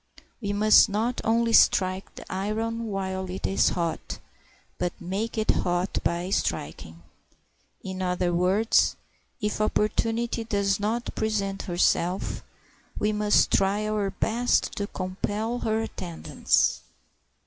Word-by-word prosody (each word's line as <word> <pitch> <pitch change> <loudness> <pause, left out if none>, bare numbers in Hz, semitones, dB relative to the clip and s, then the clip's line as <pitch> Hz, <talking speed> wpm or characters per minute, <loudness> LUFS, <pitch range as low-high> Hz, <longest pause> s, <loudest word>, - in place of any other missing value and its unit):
We 205 -2 -2
must 215 +2 +6
not 225 +5 -1
only 230 +1 +2
strike 185 -2 +3
the - - -10
iron 225 +4 -2
while 190 -2 -3
it 185 +1 -5
is 195 - +3
hot, 170 -2 -3 0.6
but 180 -1 -2
make 200 +6 -3
it 220 - +3
hot 175 +1 -1
by 175 +2 -1
striking. 80 - -3 0.8
In 190 0 -5
other 180 -1 0
words, 190 +6 +3 0.5
if 210 0 -1
opportunity 225 +2 0
does 200 -3 0
not 225 +4 -2
present 200 -3 -1
herself 175 +1 0 0.5
we 210 - +1
must 210 0 +3
try 200 +2 +2
our 210 -2 0
best 225 +5 +1
to 205 - -2
compel 205 +6 -3
her 220 -1 0
attendance. 175 -6 0
200 Hz, 120 wpm, -26 LUFS, 185-220 Hz, 0.8 s, must